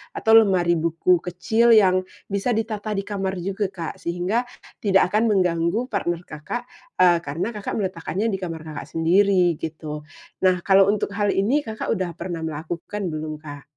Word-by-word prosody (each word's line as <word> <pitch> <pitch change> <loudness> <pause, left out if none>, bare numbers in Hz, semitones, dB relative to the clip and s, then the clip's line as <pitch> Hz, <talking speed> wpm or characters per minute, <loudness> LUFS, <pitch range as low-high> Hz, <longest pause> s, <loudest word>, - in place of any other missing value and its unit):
Atau 220 - +1
lemari 180 -5 +3
buku 170 +2 +2
kecil 220 +7 +1
yang 185 -3 +4 0.2
bisa 200 +5 0
ditata 215 -1 -3
di 195 - -1
kamar 195 -2 -2
juga, 195 +3 -2
Kak, 170 -4 -6
sehingga 180 +8 -1 0.3
tidak 195 -3 +3
akan 220 +2 +2
mengganggu 180 +5 +1
partner 175 -5 -1
Kakak, 150 +11 -5 0.4
eee, 175 -2 +6
karena, 165 +10 -3
Kakak 205 - -4
meletakkannya 190 +1 -2
di 190 - -2
kamar 165 -4 -5
Kakak 155 -2 -7
sendiri, 180 +1 +4
gitu. 155 -2 -6 0.4
Nah, 185 -1 +4
kalau 195 0 +5
untuk 210 -1 -1
hal 205 -1 +1
ini, 235 +10 +2
Kakak 220 -1 -5
udah 185 -4 -2
pernah 170 -1 -5
melakukan 170 +6 -5
belum, 155 0 -4
Kak? 145 -2 -9
185 Hz, 160 wpm, -23 LUFS, 170-205 Hz, 0.4 s, eee